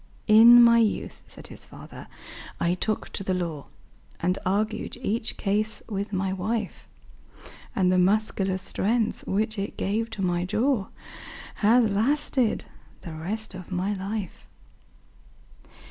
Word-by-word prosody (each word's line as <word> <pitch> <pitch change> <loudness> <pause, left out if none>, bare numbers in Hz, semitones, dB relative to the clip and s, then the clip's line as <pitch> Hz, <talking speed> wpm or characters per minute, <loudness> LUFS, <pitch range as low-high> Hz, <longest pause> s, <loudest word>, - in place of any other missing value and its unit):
"In 235 +2 +8
my 235 0 +6
youth," 220 -2 -1
said - - -13
his - - -12
fater, - - -12 0.5
"I 170 +1 +1
took 215 +4 -2
to - - -5
the 185 -1 -1
law, 165 -5 -4 0.5
And 180 +2 0
argued 215 +4 -1
each 225 -2 -2
case 215 +2 -1
with 200 -1 -4
my 190 -1 -1
wife; 210 +2 -3 0.9
And 185 -2 +2
the 185 - +3
muscular 195 0 +1
strength, 220 +4 -1
which 215 +2 -1
it 200 - -5
gave 220 +3 -1
to 210 -3 -5
my 175 -1 0
jaw, 220 +3 0 0.7
Has 225 +2 +4
lasted 240 +3 0 0.4
the 165 - -8
rest 200 +8 -5
of 185 -1 -10
my 185 +3 -1
life." 200 0 -5
205 Hz, 130 wpm, -25 LUFS, 185-220 Hz, 0.9 s, In